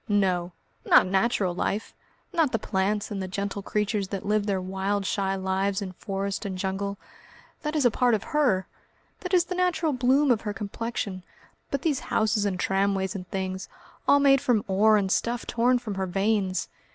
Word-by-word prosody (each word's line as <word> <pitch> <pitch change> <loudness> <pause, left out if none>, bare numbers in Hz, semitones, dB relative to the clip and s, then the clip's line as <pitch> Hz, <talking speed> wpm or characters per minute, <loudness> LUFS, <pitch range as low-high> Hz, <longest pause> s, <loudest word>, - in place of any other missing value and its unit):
"No! 185 -4 +1 0.3
not - - +6
natural 190 -1 +1
life, 200 +4 -2 0.4
not 325 -6 +2
the - - +1
plants 205 +1 -1
and 200 -2 -3
the 190 - -3
gentle 200 +2 -3
creatures 210 0 -1
that 195 -1 -5
live 210 0 +1
their 195 -2 +1
wild 195 +2 -2
shy 195 0 0
lives 190 +1 0
in 195 -2 -5
forest 195 +2 -4
and 195 -3 -4
jungle. 195 +1 -2 0.6
That 300 0 -3
is 295 -4 +2
a 245 - +5
part 245 0 +3
of 210 - -3
her. 250 -12 +1 0.5
That 365 - -6
is 355 -2 +4
the 365 - -4
natural 355 -4 +1
bloom 260 +3 +3
of 225 -3 +2
her 210 -1 -4
complexion. 205 -2 -4 0.5
But 280 - -2
these 300 -5 +1
houses 215 -1 +2
and 190 -2 -1
tramways 195 0 +1
and 185 -3 -7
things, 190 -1 -4 0.4
all 285 - +6
made 275 -2 +5
from 245 -7 +1
ore 210 +3 +4
and 195 -2 0
stuff 235 +3 0
torn 245 +2 +2
from 230 -4 -5
her 190 -1 -2
veins 195 0 0
200 Hz, 185 wpm, -26 LUFS, 190-240 Hz, 0.6 s, not